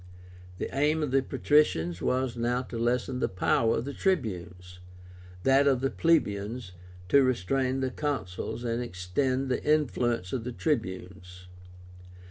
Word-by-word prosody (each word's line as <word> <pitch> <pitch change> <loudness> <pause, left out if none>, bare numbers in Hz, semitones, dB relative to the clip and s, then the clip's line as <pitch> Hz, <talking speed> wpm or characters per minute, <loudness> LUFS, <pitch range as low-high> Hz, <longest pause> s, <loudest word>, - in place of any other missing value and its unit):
The - - -5
aim 150 +3 +2
of 145 - -2
the 135 0 +4
patricians 90 - +1
was 130 -1 0
now 120 +2 0
to 120 - -7
lessen 125 +2 0
the - - 0
power 110 +4 +2
of 115 - -3
the 140 - -5
Tribunes; 90 - -2 0.6
that 135 +1 +4
of 135 -3 +3
the 135 - 0
plebeians, 115 - 0 0.4
to 140 - +6
restrain 130 +2 0
the 130 -1 -1
Consuls 120 -7 -3
and 120 0 -1
extend 125 +6 -1
the 125 - -1
influence 120 -10 +1
of 125 - -2
the 125 +1 -5
Tribunes. 95 - -3
125 Hz, 140 wpm, -28 LUFS, 95-135 Hz, 0.6 s, to